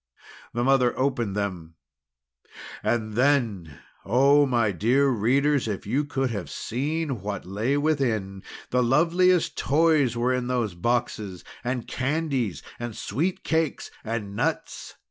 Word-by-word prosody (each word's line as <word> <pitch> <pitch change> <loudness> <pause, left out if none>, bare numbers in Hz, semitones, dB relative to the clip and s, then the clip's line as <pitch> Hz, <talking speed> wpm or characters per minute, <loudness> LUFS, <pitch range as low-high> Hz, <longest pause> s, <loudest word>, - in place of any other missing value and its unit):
The 120 - +1
mother 130 -2 +3
opened 125 -7 0
them 90 -6 -4 1.1
and 110 -2 -1
then 115 - +1 0.3
oh, 140 +7 +4
my 120 -4 +2
dear 120 - +2
readers, 135 +4 +2
if 105 -3 -4
you 135 +8 0
could 135 -3 -1
have 100 -6 -4
seen 140 - -3
what 100 0 -4
lay 110 +9 -1
within! 120 -11 0 0.3
The 125 - +3
loveliest 170 +8 +3
toys 145 -5 +3
were 125 +2 +1
in 125 -1 -1
those 120 -6 -1
boxes! 105 -2 -2 0.2
and 125 -1 -3
candies, 135 - -1 0.2
and 120 -2 -5
sweet 175 - -2
cakes, 160 -2 -1
and 110 -3 -4
nuts! 155 +8 -3
125 Hz, 125 wpm, -25 LUFS, 105-140 Hz, 1.1 s, oh